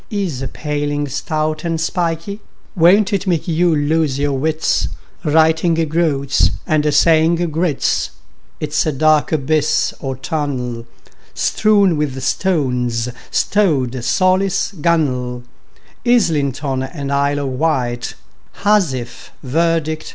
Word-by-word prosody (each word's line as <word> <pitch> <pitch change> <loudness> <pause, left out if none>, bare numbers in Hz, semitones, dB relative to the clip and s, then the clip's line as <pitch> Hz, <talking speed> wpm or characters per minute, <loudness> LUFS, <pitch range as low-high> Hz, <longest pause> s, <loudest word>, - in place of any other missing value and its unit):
— - - -38
Is 190 - -3
a 135 - -3
paling, 145 0 -3
stout 155 +2 -2
and 165 -1 -1
spikey; 170 +3 -2 0.4
Won't 195 +5 +4
it 200 0 -1
make 170 -3 0
you 170 0 +2
lose 150 -1 +1
your 145 0 0
wits, 155 +4 0 0.4
Writing 160 +2 +3
"groats" 155 -4 +1 0.2
and 150 -3 +1
saying 160 +3 +4 0.2
groats? 160 -2 0 0.5
It's 150 0 0
a - - +2
dark 155 +2 +2
abyss 155 0 +1
or 135 -2 -4
tunnel, 130 -5 -4 0.5
Strewn 200 -6 +2
with 140 -3 -2
stones, 125 -9 0
like 120 - -10 0.4
rowlock, 185 - +1
gunwale, 125 -7 0 0.6
Islington 145 - +1
and 140 +1 -5
Isle 140 +1 +1
of 140 - -2
Wight, 125 -7 -1 0.4
Housewife, 160 - -1
verdict 165 +4 +1
and - - -8
indict! 155 0 -5
155 Hz, 120 wpm, -18 LUFS, 135-170 Hz, 0.6 s, Won't